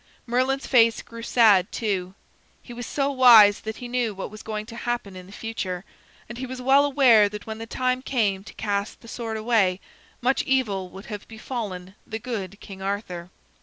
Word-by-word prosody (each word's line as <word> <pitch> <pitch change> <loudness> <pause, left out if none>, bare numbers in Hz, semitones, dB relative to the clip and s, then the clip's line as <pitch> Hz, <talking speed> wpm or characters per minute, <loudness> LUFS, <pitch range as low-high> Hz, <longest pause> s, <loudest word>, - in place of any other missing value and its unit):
Merlin's 255 +3 0
face 230 -3 +4
grew 230 0 -10
sad, 220 -5 +4
too. 190 -4 -2 0.5
He 240 - -10
was 240 0 -6
so 280 -1 0
wise 230 -6 +8
that 220 0 -6
he 245 - -7
knew 240 -4 -1
what 195 - -6
was 215 0 -10
going 215 -1 -5
to 230 +1 -10
happen 235 -5 -3
in 185 0 -10
the - - -14
future, 200 -4 -5 0.4
and 240 +2 -8
he 260 - -4
was 255 0 -7
well 270 +3 +4
aware 255 -7 +5
that 210 0 -8
when 220 0 -6
the 225 - -7
time 255 +1 -1
came 210 -8 0
to - - -11
cast 205 -1 -3
the 230 - -14
sword 225 -1 -4
away, 215 -5 +2 0.4
much 260 +2 +1
evil 205 -9 0
would 190 +2 -11
have 210 -2 -7
befallen 215 -5 -6
the 220 - -4
good 205 -4 -5
King 195 -4 -11
Arthur. 190 -3 -4
220 Hz, 195 wpm, -24 LUFS, 200-245 Hz, 0.5 s, wise